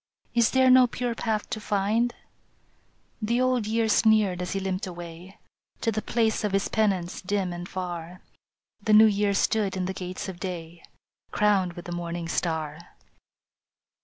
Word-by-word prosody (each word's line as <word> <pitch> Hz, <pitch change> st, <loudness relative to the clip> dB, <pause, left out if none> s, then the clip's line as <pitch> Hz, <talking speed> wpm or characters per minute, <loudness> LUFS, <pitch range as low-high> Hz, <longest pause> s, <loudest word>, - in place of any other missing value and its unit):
Is 235 Hz, -1 st, +4 dB
there 260 Hz, -1 st, +4 dB
no 255 Hz, 0 st, +7 dB
pure 245 Hz, 0 st, -3 dB
path 220 Hz, -2 st, -2 dB
to 215 Hz, -3 st, -3 dB
find? 210 Hz, +4 st, 0 dB, 0.5 s
" -, -, -40 dB
The 240 Hz, -, +3 dB
Old 255 Hz, -4 st, +1 dB
Year 225 Hz, +1 st, +1 dB
sneered 215 Hz, -4 st, +3 dB
as 180 Hz, -, -3 dB
he 195 Hz, -, -1 dB
limped 190 Hz, 0 st, -3 dB
away 175 Hz, +1 st, -9 dB, 0.4 s
To 225 Hz, -, +1 dB
the 215 Hz, 0 st, -2 dB
place 220 Hz, 0 st, 0 dB
of 210 Hz, -2 st, -1 dB
his 195 Hz, 0 st, +1 dB
penance 195 Hz, -5 st, 0 dB
dim 190 Hz, -2 st, -1 dB
and 175 Hz, +1 st, -7 dB
far. 180 Hz, -1 st, -6 dB, 0.6 s
The 215 Hz, +1 st, +1 dB
New 215 Hz, +1 st, +9 dB
Year 205 Hz, -1 st, +2 dB
stood 200 Hz, -1 st, +1 dB
in 185 Hz, -, -1 dB
the 190 Hz, -, -3 dB
gates 185 Hz, 0 st, -6 dB
of 185 Hz, -2 st, -7 dB
day, 170 Hz, -2 st, -6 dB, 0.5 s
Crowned 195 Hz, -4 st, +2 dB
with 175 Hz, 0 st, -10 dB
the 175 Hz, -, -6 dB
morning 170 Hz, -1 st, -4 dB
star. 160 Hz, -2 st, -2 dB
195 Hz, 165 wpm, -26 LUFS, 180-220 Hz, 0.6 s, New